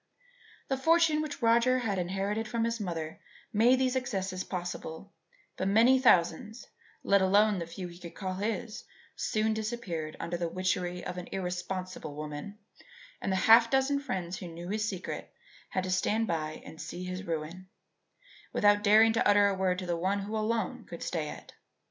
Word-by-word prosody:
The 270 - 0
fortune 320 +2 +4
which 290 -4 -5
Roger 235 +2 +4
had 210 -6 -1
inherited 195 +5 -2
from 230 +1 -1
his 230 0 -1
mother 165 -5 -4 0.3
made 235 +5 +5
these 260 0 +1
excesses 190 -7 -2
possible, 180 0 -6 0.4
but 185 - -1
many 230 +6 +5
thousands, 210 0 +2 0.4
let 200 0 +4
alone 200 +1 +4
the 170 - -4
few 180 +2 -6
he 175 0 -12
could 170 -2 -10
call 190 -2 -3
his, 215 +3 -3 0.3
soon 220 0 0
disappeared 210 -9 -4
under 175 +1 -3
the 170 -1 -2
witchery 180 0 -2
of 180 0 -4
an 175 - -8
irresponsible 180 -3 -4
woman, 150 +7 -6 0.6
and - - -1
the - - +2
half 230 +1 +8
dozen 270 +2 +2
friends 190 -10 -4
who 180 - -7
knew 170 +1 -8
his 215 +1 -1
secret 185 -2 -6 0.4
had 185 - -1
to 185 - -3
stand 210 +5 +1
by 155 -4 -3
and 160 - -10
see 160 +3 -6
his 185 0 -4
ruin, 165 +3 -4 0.8
without 205 0 +4
daring 220 +2 +6
to 230 - +2
utter 205 0 +5
a - - 0
word 185 -1 +1
to 185 - -4
the 175 -1 -1
one 190 +4 0
who 210 +2 -5
alone 220 -2 -1
could 170 - -8
stay 155 -3 -2
it. - - -10
195 Hz, 175 wpm, -30 LUFS, 180-225 Hz, 0.8 s, half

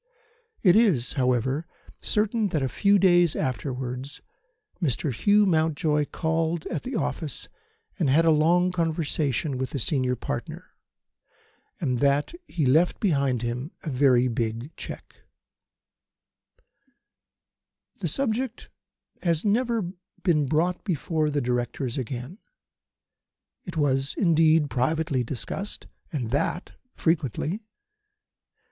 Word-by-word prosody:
It 180 -3 +6
is, 185 - +3
however, 130 +4 0 0.3
certain 215 +1 +1
that 155 -7 -1
a - - +1
few 200 - +3
days 175 -4 +4
afterwards 130 +2 -3 0.6
Mr. 145 -2 0
Hugh 205 - +4
Mountjoy 155 -3 +2
called 160 +1 -1
at 160 - -3
the 255 - -5
office - - -2 0.5
and 155 -6 +2
had 160 +5 +4
a 165 - +6
long 170 +4 +3
conversation 155 -5 -1
with 130 -1 -2
the - - -4
senior 130 -1 0
partner, - - -6 1.1
and 125 -2 0
that 140 - +2
he 155 -5 -1
left 155 +7 +3
behind 140 - +1
him 125 +6 -3
a 155 - -3
very 130 -2 +4
big 115 +3 -3
cheque. - - -9 2.8
The - - -2
subject 255 -2 -1 0.5
has 170 -1 0
never 225 -3 +1 0.3
been 150 -6 +2
brought 170 +5 0
before 155 -3 0
the 145 -1 0
Directors 125 +1 -2
again. 130 - -6 1.3
It 175 -4 -7
was, 135 -2 +1
indeed, 160 -4 +4
privately 140 +1 0
discussed, 125 - -5 0.3
and 125 -8 -3
that 145 +6 -1 0.2
frequently. 160 - 0
150 Hz, 110 wpm, -26 LUFS, 130-175 Hz, 2.8 s, It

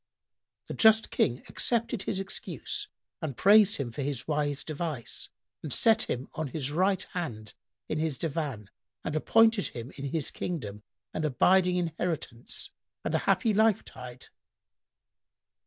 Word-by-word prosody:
The - - -6
just 220 0 +5
King 120 +1 +1
accepted 235 -2 0
his 190 - -1
excuse 195 0 -4 0.3
and 145 -6 -4
praised 205 0 +6
him 130 -4 -3
for 130 - -5
his 140 -3 -3
wise 145 -2 -1
device 155 -6 -4 0.3
and 155 - -6
set 225 - +4
him 125 +3 -2
on 155 -1 -3
his 140 0 -1
right 185 +4 +2
hand 115 - -4 0.3
in 155 - -2
his 155 -4 0
divan 140 - -3 0.3
and 150 - -3
appointed 225 +5 +4
him 120 +3 -7
in 140 - -4
his 145 +1 0
kingdom 105 - -4 0.3
an 155 - -2
abiding 180 +6 +4
inheritance 165 -7 -3 0.3
and - - -1
a - - +3
happy 225 -3 +3
life 220 0 +3
tide. 125 0 -10
155 Hz, 140 wpm, -29 LUFS, 135-190 Hz, 0.3 s, praised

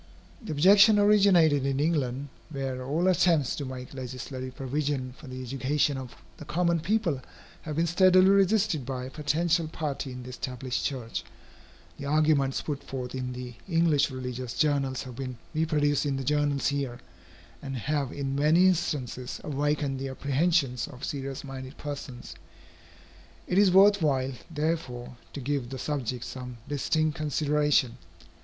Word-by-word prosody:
The 220 - -6
objection 200 +8 +6
originated 195 -8 +5
in 135 0 0
England, 145 -3 0 0.2
where 135 -3 -4
all 155 +7 0
attempts 170 -6 +3
to 145 - -3
make 130 0 -7
legislative 130 0 -6
provision 135 -1 -2
for 150 - -13
the 130 0 -6
education 135 +3 0
of 130 -2 -7 0.2
the - - -9
common 170 +2 +1
people 170 - 0 0.4
have 155 -2 -5
been 165 +2 +2
steadily 185 +2 +5
resisted 200 -5 +3
by 130 0 -4
a 130 - -8
potential 160 +3 +1
party 145 -4 -4
in 125 0 -7
the 125 - -9
established 125 0 -4
church. 125 -5 -3 0.8
The 140 - -5
arguments 150 -2 +2
put 145 -2 -4
forth 125 -2 -5
in 125 -1 -3
the 125 0 -7 0.2
English 165 -4 +3
religious 125 -2 -5
journals 140 -4 +1
have 125 -3 -9
been 130 -2 -5 0.2
reproduced 150 -2 +1
in 135 -1 0
the 135 - -3
journals 145 0 +1
here, 135 -4 -3 0.6
and 135 -2 -5
have 140 +1 -1
in 135 -1 -3
many 155 +6 +4
instances 135 -8 -2
awakened 145 -1 -1
the 135 0 -3
apprehensions 140 -1 +1
of 130 -1 -8
serious 135 -1 -4
minded 135 -1 -8
persons. 140 -7 -7 1.1
It 185 - +2
is 205 -2 +6
worth 200 +2 +6
while, 135 -3 +1 0.2
therefore, 150 -7 -3 0.2
to - - -5
give 135 -2 -2
the 135 - -5
subject 130 -4 -3
some 125 -2 -7
distinct 155 +2 0
consideration. 150 -4 +1
140 Hz, 150 wpm, -28 LUFS, 130-155 Hz, 1.1 s, objection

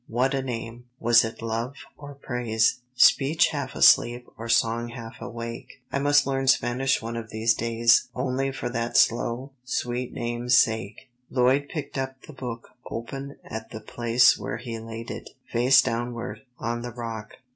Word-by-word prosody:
What 125 +4 +1
a 135 - 0
name! 120 -1 -6
Was 120 +1 +5
it 110 0 -6
love 115 +4 -3 0.2
or 145 -1 -10
praise? 120 -4 0 0.2
Speech 150 +6 +5
half 140 -4 -4
asleep 120 +1 +5
or 115 +1 -7
song 115 0 +2
half 115 -2 -9
awake? 115 +2 -7
I 140 - 0
must 145 0 +4
learn 135 -1 -1
Spanish 130 0 +2
one 115 +1 -4
of 115 -1 -6
these 110 +2 +2
days 115 +1 +3
Only 130 +1 -1
for 130 - -4
that 115 0 -1
slow, 120 +3 +2
sweet 125 -1 -2
name's 120 +1 +1
sake.'" 110 +1 0 0.2
Lloyd 130 +3 +2
picked 145 -4 -5
up 130 0 -4
the 155 - -11
book 120 -3 -7 0.2
open 135 +4 -6
at 110 - -7
the 110 - -7
place 120 +2 +3
where 105 - -4
he 115 -1 -6
laid 115 +1 -7
it, - - -7 0.2
face 125 +2 +5
downward, 115 -2 -3 0.2
on 120 +1 -3
the 120 - -5
rock. 115 -3 -6
120 Hz, 165 wpm, -25 LUFS, 115-130 Hz, 0.2 s, Was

